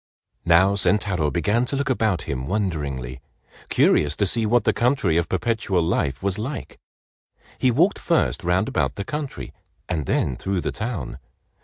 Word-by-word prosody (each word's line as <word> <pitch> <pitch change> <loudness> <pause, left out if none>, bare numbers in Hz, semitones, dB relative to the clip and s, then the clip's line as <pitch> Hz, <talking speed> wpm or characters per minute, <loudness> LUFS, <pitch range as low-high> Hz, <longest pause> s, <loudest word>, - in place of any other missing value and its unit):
Now 95 +4 +5
Sentaro 100 -5 +1
began 105 +8 +1
to 140 - -3
look 140 -1 -1
about 110 -7 0
him 65 -3 -4
wonderingly, 70 - -3 0.5
curious 75 +1 +3
to 100 - +1
see 110 +3 +1
what 120 +1 +3
the - - +2
country 120 - +1
of 85 0 +1
Perpetual 95 -2 0
Life 70 -3 -1
was 100 +1 0
like. 130 +6 -6 0.8
He 130 - +3
walked 165 - +2
first 165 - 0
round 90 +4 +1
about 135 - -1
the 100 - -5
country 150 -2 -5 0.3
and 75 -4 -2
then 65 -3 0
through 95 -2 -2
the - - -2
town. 95 - -5
100 Hz, 160 wpm, -23 LUFS, 80-115 Hz, 0.8 s, Now